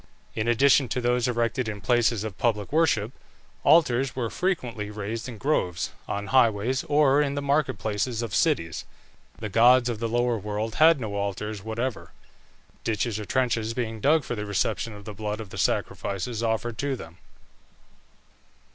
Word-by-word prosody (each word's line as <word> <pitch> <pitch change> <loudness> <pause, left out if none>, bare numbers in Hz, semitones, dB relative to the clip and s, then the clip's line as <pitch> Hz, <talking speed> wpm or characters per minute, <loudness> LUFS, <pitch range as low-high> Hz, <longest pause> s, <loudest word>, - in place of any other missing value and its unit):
In 110 0 -2
addition 135 +3 +4
to 125 - -1
those 125 0 +1
erected 120 0 0
in 105 -1 -5
places 120 -2 +2
of 105 -5 -6
public 105 -4 0
worship, 140 -9 +2 0.5
altars 135 -5 +4
were 120 -3 -2
frequently 125 - -2
raised 110 +3 -5
in 115 - -8
groves, 90 - -1 0.2
on 100 0 -3
highways, 120 0 +3
or 145 -1 +4
in 140 -1 -1
the - - -1
market 140 -4 +1
places 110 +3 -2
of 110 -5 -5
cities. 85 -1 +1 0.5
The 110 - -5
gods 120 +4 +5
of 115 -3 -3
the 115 0 -2
lower 120 0 +1
world 105 +2 -3
had 160 -1 +7
no 110 -4 -4
altars 100 +1 -3
whatever, 115 +3 -4 0.7
ditches 110 0 -1
or 105 - -5
trenches 115 -2 0
being 115 -3 -3
dug 155 +4 +4
for - - -4
the 105 -2 -4
reception 100 +2 -1
of 105 -1 -11
the 105 - -6
blood 105 +1 -4
of 105 -4 -8
the - - -8
sacrifices 105 +4 -1
offered 115 0 -1
to 140 -1 -1
them. 85 -7 -11
115 Hz, 165 wpm, -26 LUFS, 105-130 Hz, 0.7 s, had